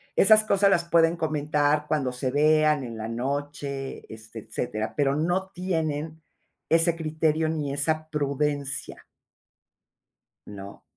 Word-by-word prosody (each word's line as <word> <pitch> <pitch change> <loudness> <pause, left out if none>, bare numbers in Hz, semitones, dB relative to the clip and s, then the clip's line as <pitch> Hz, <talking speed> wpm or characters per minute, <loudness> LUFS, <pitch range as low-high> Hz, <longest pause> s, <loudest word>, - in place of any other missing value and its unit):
Esas 215 +2 +6
cosas 200 -1 +3
las 170 -3 +2
pueden 165 0 +3
comentar 150 -1 0
cuando 135 -5 0
se 125 +1 -3
vean, 155 0 +3
en 115 -2 -7
la 110 0 -5
noche, 140 +2 -4
este, 110 +1 -10
etcétera, 110 0 -4
pero 140 -2 +1
no 175 +5 -1
tienen 160 -4 -3 0.5
ese 165 +1 +4
criterio, 155 0 0
ni 150 -3 -2
esa 155 +2 0
prudencia. 145 -1 -2 1.4
¿No? 100 -1 -10
150 Hz, 120 wpm, -25 LUFS, 135-160 Hz, 1.4 s, Esas